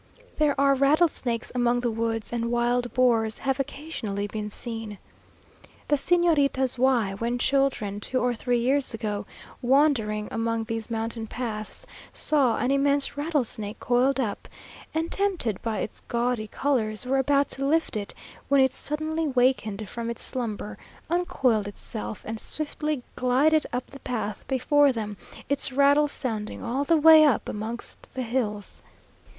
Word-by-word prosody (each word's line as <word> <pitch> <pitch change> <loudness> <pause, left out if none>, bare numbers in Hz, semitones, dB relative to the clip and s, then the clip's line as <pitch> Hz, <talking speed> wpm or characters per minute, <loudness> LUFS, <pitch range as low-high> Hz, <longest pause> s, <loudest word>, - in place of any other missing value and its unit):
There 295 -2 +2
are 275 0 +5
rattlesnakes 275 -4 +2
among 245 -1 +2
the 240 -1 0
woods, 225 0 -2
and 235 -1 -1
wild 240 +1 +1
boars 230 -3 +2
have 270 0 -1
occasionally 260 -8 -4
been 210 0 -4
seen. 225 -1 -6 0.9
The 295 - +5
Señoritas 285 -5 +2
Y, 245 -6 +3
when 235 +1 -1
children, 255 -7 +1
two 255 +5 -1
or 245 -1 +1
three 245 +1 0
years 260 +1 +1
ago, 210 -2 -3 0.3
wandering 245 -6 +2
among 230 0 -1
these 225 0 -4
mountain 225 0 -3
paths, 220 - -5 0.3
saw 275 -6 +3
an 245 +4 0
immense 280 +1 +2
rattlesnake 250 -8 -2
coiled 255 +2 +2
up, 220 -6 -2 0.4
and 325 +1 -2
tempted 365 - 0
by 225 -2 -2
its - - -5
gaudy 235 -2 -1
colours, 230 -4 -1
were 270 +2 +1
about 280 +1 +2
to 275 - -2
lift 320 -2 +1
it, 205 -1 -4 0.3
when 280 0 +5
it 265 -1 +4
suddenly 310 +2 -2
wakened 245 -6 +1
from 235 +3 -5
its 235 - -4
slumber, 220 -4 -4 0.3
uncoiled 255 - +1
itself, 215 0 -6
and 220 0 -5
swiftly 300 -1 -3
glided 280 +5 +3
up 250 +1 -2
the 275 - -10
path 220 -5 -4
before 280 +2 +3
them, 215 -4 -4 0.3
its 280 -1 +1
rattles 285 +2 +4
sounding 220 -5 -3
all 255 +4 -1
the 330 +3 +3
way 315 0 +8
up 290 -6 +3
amongst 220 +3 -5
the 260 - -2
hills. 225 -4 -3
245 Hz, 145 wpm, -26 LUFS, 225-280 Hz, 0.9 s, way